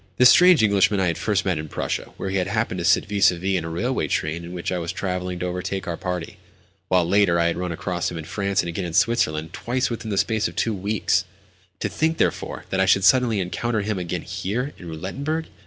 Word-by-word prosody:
This 125 0 +8
strange 180 -7 +6
Englishman 100 -1 +3
I 95 - +2
had 85 -2 0
met - - -8
first 105 -3 0
in 80 -5 -1
Prussia, - - -3
where - - -5
we 95 - -1
had 90 -1 0
happened 105 -2 -1
to - - -3
sit 85 - +4
vis 100 -2 +4
à 90 - -5
vis 95 +2 -1
in 90 - -1
a 80 - -5
railway 120 +11 -1
train 80 +2 -2
in 85 - -8
which 90 0 -4
I 90 - -1
was 85 0 -3
travelling 90 -2 -3
to 90 - -3
overtake 90 +2 -3
our 85 - -2
party; 90 -2 -5 0.5
while, 90 -2 +3
later, 95 -2 +3
I 85 - +3
had 85 - 0
run 90 0 -3
across 85 +1 -2
him 85 - -6
in 80 - -5
France, 100 +2 0
and - - -5
again 85 +2 -3
in 85 - -5
Switzerland—twice 115 - 0
within 115 -1 -5
the 100 - -2
space 110 +1 +1
of - - -9
two 115 - 0
weeks! 95 -2 0 0.6
To - - 0
think, 160 +1 0
therefore, - - -1
that 95 - 0
I 95 - +3
should 95 +1 +4
suddenly 120 0 +4
encounter 110 +5 -1
him 105 -1 -2
again 90 -1 -3
here, 100 +10 -3
in 90 - -9
Roulettenberg! 140 - -3
95 Hz, 240 wpm, -23 LUFS, 85-110 Hz, 0.6 s, This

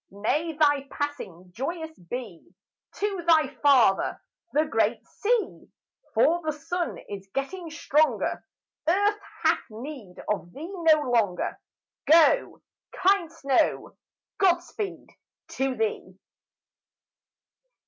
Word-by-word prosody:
May 295 - -1
thy 290 -2 +2
passing 185 - -5
joyous 320 - -4
be 180 -2 -8 0.4
To 400 -3 -2
thy 315 -4 +5
father, 255 -9 +4 0.3
the 305 +2 +2
great 310 - 0
sea, 460 +1 -1 0.5
For 345 +1 +4
the 310 - 0
sun 345 +4 -3
is 195 -1 -8
getting 330 +6 -3
stronger; 310 -1 +1 0.4
Earth 405 +5 +3 0.2
hath - - +4
need 225 -4 -9
of 200 -4 -2
thee 325 +8 -7
no 325 -4 +4
longer; 225 -9 0 0.6
Go, 335 +10 +5 0.3
kind 375 -3 +2
snow, 280 -5 0 0.4
God 360 -3 +4
speed 400 +3 -6 0.4
to 265 -1 -1
thee! 210 -4 -3
300 Hz, 105 wpm, -26 LUFS, 230-340 Hz, 0.6 s, thy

